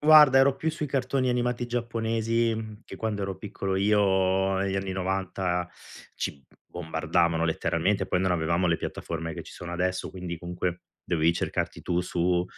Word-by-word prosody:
guarda, 150 -3 +8
ero 135 0 +5
più 160 +4 -1
sui 155 -1 -3
cartoni 130 -1 0
animati 125 0 0
giapponesi, 115 -2 -1
che - - -9
quando 105 -3 -2
ero 95 -1 -3
piccolo 95 -2 -3
io 95 -1 +3
negli 95 0 0
anni 95 -1 -2
'90 95 -1 -1 0.5
ci 70 -1 -4 0.2
bombardavano 85 0 0
letteralmente. 85 +4 +1
Poi 90 -1 +1
non 95 -1 +2
avevamo 85 +2 +1
le 85 -1 +3
piattaforme 80 0 -4
che - - -6
ci - - -12
sono 85 0 -7
adesso, 90 +1 -1
quindi 90 -2 -5
comunque 90 0 -3 0.3
dovevi 85 0 +2
cercarti - - -2
tu 90 -1 0
su, 90 0 +1
95 Hz, 155 wpm, -27 LUFS, 90-115 Hz, 0.5 s, guarda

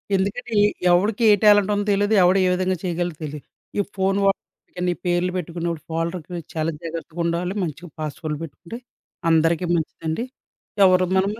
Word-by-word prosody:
ఎందుకంటే, 215 +5 -2
ఎ - - +6 0.2
ఎవడికి 205 +6 +2
ఏ - - +8
టాలెంటుందో 205 -1 +4
తెలీదు, 205 +2 +2
ఎవడు 185 +2 +4
ఏ - - +3
విధంగా 185 0 0
చేయగలడో 175 -2 -2
తెలీదు. 150 -1 -6 0.3
ఈ - - +5 0.2
ఫోను 195 +1 +1
వాడి 180 -2 -3
పేర్లు 175 +1 +1
పెట్టుకున్నప్పుడు 170 -2 -4
ఫోల్డర్‌కి 170 +1 -3
చాలా 160 +1 0
జాగ్రత్తగా 165 0 -7
ఉండాలి. 175 +3 -1
మంచిగా 170 +1 -6
పాస్‌వర్డ్‌లు 150 0 -4
పెట్టుకుంటే, 170 +8 -9 0.5
అందరికీ 165 +2 +3
మంచిదండి. 160 +5 -3 0.6
ఎవరు 185 0 +5
మనము 200 +3 0
180 Hz, 140 wpm, -22 LUFS, 165-195 Hz, 0.6 s, ఏ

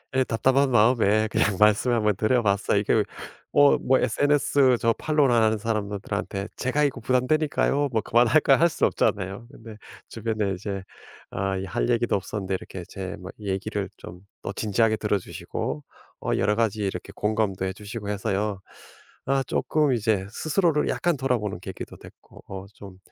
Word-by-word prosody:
예 130 - +4
답답한 130 +4 +2
마음에 110 -2 +4
그냥 100 -2 +1
말씀을 105 +3 +4
한번 105 -3 +2
드려봤어요. 110 -2 +1
이게 - - +2 0.5
뭐 145 0 +5
뭐 130 0 +3
sns 140 -3 +3
저 115 0 +2
follow하는 120 -8 +3
사람들한테 100 -2 -3
"제가 145 +4 0
이거 130 -4 -2
부담되니까요. 140 +3 +1
뭐 110 - +1
그만할까요?" 125 +4 +4
할 170 +1 +4
수 - - +1
없잖아요. 100 +4 -1
근데 110 -5 -11 0.3
주변에 110 -4 -2
이제 95 +1 -5 0.5
아 95 0 -2
이 95 - -4
할 - - -2
얘기도 120 -1 +2
없었는데 95 0 -3
이렇게 90 -2 -9
제 95 -1 -6
뭐 90 +1 -8
얘기를 100 0 -3
좀 90 +1 -11 0.2
또 - - -5
진지하게 110 +1 +1
들어주시고 100 -8 -3 0.4
어 - - -2
여러 105 - +2
가지 110 -2 0
이렇게 100 0 -4
공감도 105 -3 -1
해주시고 105 +2 -6
해서요. 100 0 -2 0.6
아 135 0 +1
조금 150 +2 +1
이제 110 -4 0
스스로를 155 +2 +1
약간 175 -4 0
돌아보는 120 -8 -1
계기도 95 - -8
됐고 - - -16
어 95 0 -7
좀 95 -3 -12
110 Hz, 360 characters per minute, -25 LUFS, 100-130 Hz, 0.6 s, 뭐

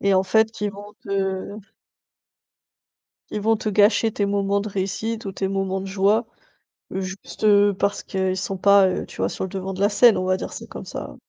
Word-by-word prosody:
et 200 -1 +2
en 185 - +4
fait 220 +3 +1
ils 210 -1 0
vont 205 +1 -11
te 195 0 -2 1.8
ils 210 - -3
vont 225 +2 +3
te 215 - -3
gâcher 210 +2 +3
tes 205 -1 -1
moments 200 0 0
de 215 - -5
réussite 205 +4 -3
ou 195 - -3
tes 195 0 -2
moments 195 0 -2
de - - -6
joie. 200 +4 +2 0.7
Juste, 190 +2 -6
heu, 205 -1 +5
parce 200 +1 0
qu'ils 190 -1 -1
sont 190 +1 -3
pas, 200 0 +5
heu, - - -3
tu - - -14
vois, - - 0
sur - - -5
le - - -7
devant 190 +1 -4
de 190 - -6
la 205 - +4
scène, 225 +2 +5
on 185 - -1
va 185 0 +1
dire - - -6
ça - - -8
comme - - -9
ça. - - -7
200 Hz, 215 wpm, -23 LUFS, 190-205 Hz, 1.8 s, heu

